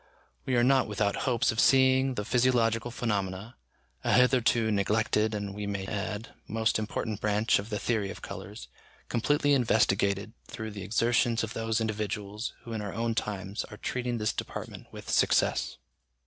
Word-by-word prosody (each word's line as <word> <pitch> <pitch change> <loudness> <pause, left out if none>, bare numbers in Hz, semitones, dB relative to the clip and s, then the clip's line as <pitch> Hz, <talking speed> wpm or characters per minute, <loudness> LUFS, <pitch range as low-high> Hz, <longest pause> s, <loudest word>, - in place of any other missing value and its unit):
We 130 - +1
are 120 - +4
not 130 +1 +4
without 105 -1 0
hopes 120 -2 +2
of 110 - -3
seeing 130 0 +4
the 105 - -3
physiological 120 -1 +2
phenomena, 105 -1 -3 0.5
a - - +1
hitherto 125 -3 +4
neglected, 105 +1 +1
and, 100 -1 -4
we 105 0 -5
may 100 -1 -3
add, 105 +2 -4 0.2
most 110 0 +1
important 110 0 -3
branch 105 +1 +2
of 100 +2 -6
the 105 - -2
theory 105 -3 -1
of - - -9
colours, - - -8 0.4
completely 145 +4 +2
investigated 105 -4 +2
through 110 -1 -6
the 100 -1 -7
exertions 115 +3 +2
of 110 - -4
those 115 0 -1
individuals 105 0 -3
who 115 - -7
in 110 - -3
our 100 -2 -5
own 115 +1 0
times 100 -2 -3
are 105 - -11
treating 125 0 -2
this 105 -1 0
department - - -6
with - - -10
success. - - +2
110 Hz, 160 wpm, -29 LUFS, 105-120 Hz, 0.5 s, are